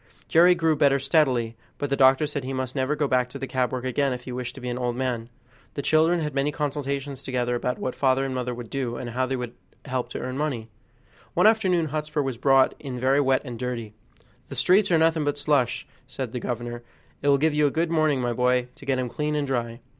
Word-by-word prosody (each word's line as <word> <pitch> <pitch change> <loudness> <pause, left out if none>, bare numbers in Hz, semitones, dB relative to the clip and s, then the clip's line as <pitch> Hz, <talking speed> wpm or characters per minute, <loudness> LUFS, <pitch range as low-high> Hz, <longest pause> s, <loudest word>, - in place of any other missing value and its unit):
Jerry 175 +2 +6
grew 165 -2 +2
better 140 -2 +4
steadily, 130 -5 +1 0.2
but 145 -1 -3
the - - +3
doctor 135 +2 +5
said 145 -1 -3
that 130 - -8
he 135 - -3
must 130 0 -3
never 135 +2 0
go 145 -1 0
back 125 -1 +1
to - - -7
the - - -4
cab 130 -1 -1
work 130 0 -4
again 135 +1 +1
if 125 0 -6
he 125 - -7
wished 125 0 -5
to 135 - -10
be 125 - -5
an 120 - -3
old 120 -1 -1
man. 125 -3 -2 0.5
The 140 - -3
children 160 +3 +3
had 150 -2 -3
many 140 +2 +1
consultations 140 -2 -3
together 125 -2 -1
about 125 +1 -1
what 130 - -3
father 135 0 +2
and 135 - -3
mother 125 -1 -2
would 120 -2 -9
do, 130 -4 -2
and 120 - -5
how 130 +2 0
they 135 - -1
could 125 -2 -5 0.3
help 125 -3 -2
to - - -5
earn 130 +2 -4
money. 125 -7 -2 0.7
One - - +4
afternoon 185 -7 +3
Hotspur 150 0 -2
was 135 -3 -3
brought 135 +1 +4
in 135 -4 -6
very 135 +3 +3
wet 135 -1 +2
and 120 -3 -7
dirty. 120 -4 -4 0.5
"The - - -8
streets 190 +3 +4
are 165 - +5
nothing 160 -1 +3
but 145 0 -1
slush," 140 -4 +1 0.2
said 130 -2 -5
the 125 - -3
governor; 120 0 -4 0.4
"it 145 - -2
will 140 -1 +5
give 155 +2 +2
you 150 0 +3
a - - +2
good 165 +3 -1
warming, 155 -4 +2
my 120 -1 0
boy, 125 +1 +1
to - - -12
get 135 -1 +2
him 130 -1 -1
clean 150 +5 -2
and 145 -1 0
dry." 120 -3 -3
135 Hz, 245 wpm, -25 LUFS, 125-150 Hz, 0.7 s, Jerry